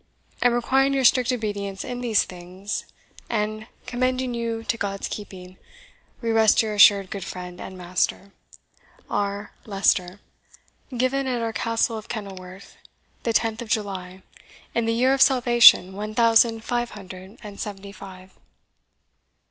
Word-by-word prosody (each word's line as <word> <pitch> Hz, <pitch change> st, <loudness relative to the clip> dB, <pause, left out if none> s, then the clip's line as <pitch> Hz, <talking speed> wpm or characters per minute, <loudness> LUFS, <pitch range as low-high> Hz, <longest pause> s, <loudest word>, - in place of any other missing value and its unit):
And 245 Hz, -1 st, +3 dB
requiring 270 Hz, +3 st, +2 dB
your 270 Hz, -, +1 dB
strict 255 Hz, +1 st, +4 dB
obedience 205 Hz, -5 st, -3 dB
in 245 Hz, -1 st, -5 dB
these 230 Hz, -4 st, +2 dB
things, 180 Hz, +3 st, -6 dB, 0.4 s
and 215 Hz, 0 st, -2 dB, 0.2 s
commending 255 Hz, 0 st, -1 dB
you 230 Hz, -1 st, -3 dB
to 230 Hz, -, -1 dB
God's 200 Hz, -3 st, -3 dB
keeping, 185 Hz, -3 st, -9 dB, 0.6 s
we 230 Hz, -1 st, -1 dB
rest 220 Hz, -1 st, +4 dB
your 215 Hz, -1 st, -3 dB
assured 200 Hz, -2 st, +6 dB
good 195 Hz, -, -5 dB
friend 180 Hz, -1 st, -8 dB
and 190 Hz, -, -8 dB
master, 180 Hz, +2 st, -2 dB, 0.8 s
"R. 205 Hz, 0 st, -2 dB, 0.2 s
LEICESTER. 195 Hz, -2 st, +1 dB, 0.8 s
"Given 265 Hz, +2 st, 0 dB
at 245 Hz, -2 st, -1 dB
our 225 Hz, -1 st, -2 dB
Castle 230 Hz, 0 st, 0 dB
of 215 Hz, -, -14 dB
Kenilworth, 190 Hz, -3 st, -8 dB, 0.4 s
the 230 Hz, -, -1 dB
tenth 225 Hz, +1 st, 0 dB
of 235 Hz, -, -8 dB
July, 190 Hz, -3 st, -3 dB, 0.5 s
in 235 Hz, -1 st, 0 dB
the 230 Hz, -, +1 dB
year 255 Hz, +3 st, +3 dB
of 270 Hz, -, 0 dB
Salvation 240 Hz, -8 st, +6 dB
one 210 Hz, +2 st, -6 dB
thousand 230 Hz, -1 st, +4 dB
five 240 Hz, 0 st, -1 dB
hundred 190 Hz, +1 st, -11 dB
and 205 Hz, -1 st, -10 dB
seventy 200 Hz, -1 st, -6 dB
five." 185 Hz, -1 st, -12 dB
215 Hz, 140 wpm, -24 LUFS, 195-235 Hz, 0.8 s, assured